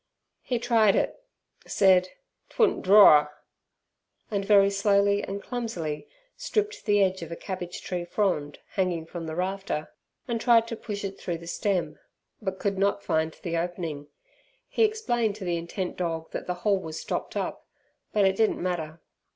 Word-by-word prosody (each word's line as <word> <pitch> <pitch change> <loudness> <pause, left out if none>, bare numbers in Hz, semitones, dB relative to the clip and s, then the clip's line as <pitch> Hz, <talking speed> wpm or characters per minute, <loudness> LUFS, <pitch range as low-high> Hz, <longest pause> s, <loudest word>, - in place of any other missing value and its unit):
He 250 - -1
tried 230 -4 +3
it, - - +1 0.5
said 185 -2 +4 0.4
"'twouldn't 450 - +2
draw'r", 185 -7 +7 1.0
and 200 -2 0
very 200 -1 +5
slowly 200 0 +3
and 200 +1 -5
clumsily 185 -12 -4 0.3
stripped 425 0 -2
the 205 -2 +4
edge 190 -1 0
of 165 - -7
a - - -3
cabbage 180 -1 -6
tree 180 -1 -3
frond 175 -6 -1
hanging 180 -4 -1
from 165 0 -7
the 160 - -4
rafter, 185 -3 -3 0.3
and 235 -2 -2
tried 230 -1 +5
to 230 - -3
push 205 -2 -6
it 195 0 -5
through 170 -2 -3
the 170 - -12
stem, 170 -4 -1 0.4
but 190 -3 -3
could 195 0 -1
not 200 0 +1
find 160 0 0
the 170 -2 -1
opening. 165 -4 -4 0.6
He - - +1
explained 240 - 0
to 205 -3 -7
the 175 -1 0
intent 175 +2 -4
dog 165 -2 -3
that - - -5
the 180 - -1
hole 200 -2 +3
was 160 -3 -6
stopped - - -4
up, - - -4 0.4
but 205 -2 +3
it 190 0 +3
didn't 220 +1 +2
matter. 165 -3 -3
190 Hz, 165 wpm, -27 LUFS, 170-205 Hz, 1.0 s, draw'r